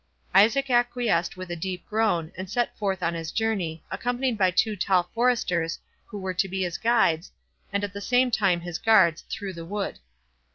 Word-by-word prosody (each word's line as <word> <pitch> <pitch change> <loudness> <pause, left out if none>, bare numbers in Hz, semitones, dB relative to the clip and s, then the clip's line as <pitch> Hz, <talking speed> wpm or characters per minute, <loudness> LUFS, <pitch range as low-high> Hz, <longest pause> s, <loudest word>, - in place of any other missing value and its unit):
Isaac 240 +8 +4
acquiesced 240 -8 +1
with 185 -1 -7
a - - -2
deep 180 +1 -5
groan, 210 -7 0
and 185 0 -6
set 240 +4 -1
forth 190 -3 -2
on 170 - +1
his 165 -1 -5
journey, 190 -8 -1
accompanied 245 0 -1
by 190 -3 +3
two 210 +4 +1
tall 185 -2 +2
foresters, 225 -9 +1 0.3
who 210 - -8
were 190 -1 -3
to 180 +2 +1
be 190 +1 -2
his 175 -1 -3
guides, 220 -8 +2 0.4
and 200 +1 -1
at 200 -2 -3
the 200 - -6
same 250 +3 +2
time 190 -6 +2
his 175 -1 -5
guards, 190 -8 +4
through 200 -3 -5
the 170 -1 -8
wood. 200 +4 -4
195 Hz, 190 wpm, -26 LUFS, 175-225 Hz, 0.4 s, Isaac